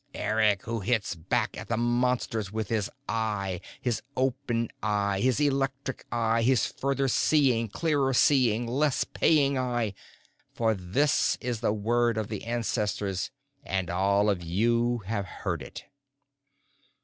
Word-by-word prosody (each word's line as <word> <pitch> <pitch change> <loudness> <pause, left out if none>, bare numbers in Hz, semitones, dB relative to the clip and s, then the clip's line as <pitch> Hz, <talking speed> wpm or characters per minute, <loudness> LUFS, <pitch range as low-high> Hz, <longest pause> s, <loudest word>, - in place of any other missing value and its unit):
Eric 110 -3 +1
who 115 0 -3
hits 110 0 0
back 110 +8 -1
at - - -7
the 115 - -1
Monsters 120 -3 0
with 110 -2 -3
his 110 -3 0 0.2
eye, 105 -5 -2 0.2
his 120 -3 -1 0.2
open 125 -3 0
eye, 100 -2 0
his 130 +4 +2
electric 135 -2 -1
eye, 115 -1 +1
his 125 +1 +3
further 135 0 -1
seeing, 130 -3 +3
clearer 140 +3 0
seeing, 120 -3 +3
less 135 +4 +1
paying 140 -4 +2
eye. 120 -5 -1 0.6
For 115 -1 +2
this 105 +10 +1
is 120 -2 -3
the 115 - +1
word 115 +2 +1
of 110 -2 -2
the 105 -1 -5
ancestors, 105 -4 -1 0.3
and 95 -6 -2
all 100 +3 +2
of 100 -4 +1
you 115 +6 +1
have 100 -2 -2 0.2
heard - - -1
it." - - -9
115 Hz, 135 wpm, -28 LUFS, 105-125 Hz, 0.6 s, his